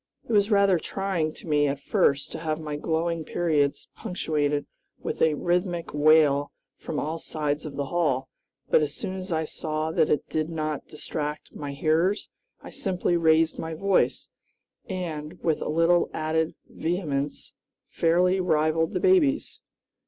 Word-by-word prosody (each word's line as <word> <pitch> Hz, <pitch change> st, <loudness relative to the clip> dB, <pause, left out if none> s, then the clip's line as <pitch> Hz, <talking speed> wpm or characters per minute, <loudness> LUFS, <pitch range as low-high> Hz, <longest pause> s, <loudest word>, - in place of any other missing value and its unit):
It 235 Hz, -, -2 dB
was 205 Hz, 0 st, +4 dB
rather 200 Hz, -4 st, +4 dB
trying 185 Hz, -4 st, -2 dB
to -, -, -13 dB
me 145 Hz, -1 st, +3 dB
at 140 Hz, 0 st, -2 dB
first 140 Hz, 0 st, +1 dB
to -, -, -5 dB
have 155 Hz, -1 st, -2 dB
my 150 Hz, -2 st, -4 dB
glowing 165 Hz, +2 st, -1 dB
periods 150 Hz, -4 st, 0 dB
punctuated 150 Hz, -5 st, -1 dB, 0.3 s
with -, -, -5 dB
a 155 Hz, -2 st, +4 dB
rhythmic 175 Hz, +1 st, -1 dB
wail 145 Hz, -1 st, +4 dB, 0.2 s
from 150 Hz, -, -4 dB
all 160 Hz, +2 st, -3 dB
sides 150 Hz, -1 st, -2 dB
of 140 Hz, -, -8 dB
the 140 Hz, 0 st, -2 dB
hall; 135 Hz, -4 st, 0 dB, 0.4 s
but -, -, +4 dB
as 150 Hz, -1 st, -2 dB
soon 190 Hz, -, -4 dB
as 185 Hz, 0 st, -6 dB
I 160 Hz, -1 st, 0 dB
saw 155 Hz, 0 st, -3 dB
that 155 Hz, -, +2 dB
it 150 Hz, -, +1 dB
did 155 Hz, 0 st, -1 dB
not 155 Hz, -3 st, -3 dB
distract 150 Hz, 0 st, -5 dB
my 145 Hz, -1 st, -5 dB
hearers, 165 Hz, +7 st, +1 dB, 0.3 s
I -, -, -9 dB
simply 180 Hz, -2 st, -1 dB
raised 160 Hz, -1 st, +3 dB
my 160 Hz, 0 st, -4 dB
voice, 195 Hz, +3 st, +1 dB, 0.6 s
and, 170 Hz, -3 st, -5 dB
with 160 Hz, -2 st, +1 dB
a -, -, -2 dB
little 165 Hz, +2 st, +3 dB
added 160 Hz, +1 st, 0 dB
vehemence, 150 Hz, -5 st, -3 dB, 0.4 s
fairly 180 Hz, +3 st, +3 dB
rivaled 160 Hz, -2 st, +1 dB
the -, -, +2 dB
babies. 345 Hz, -7 st, +3 dB
160 Hz, 155 wpm, -26 LUFS, 150-175 Hz, 0.6 s, was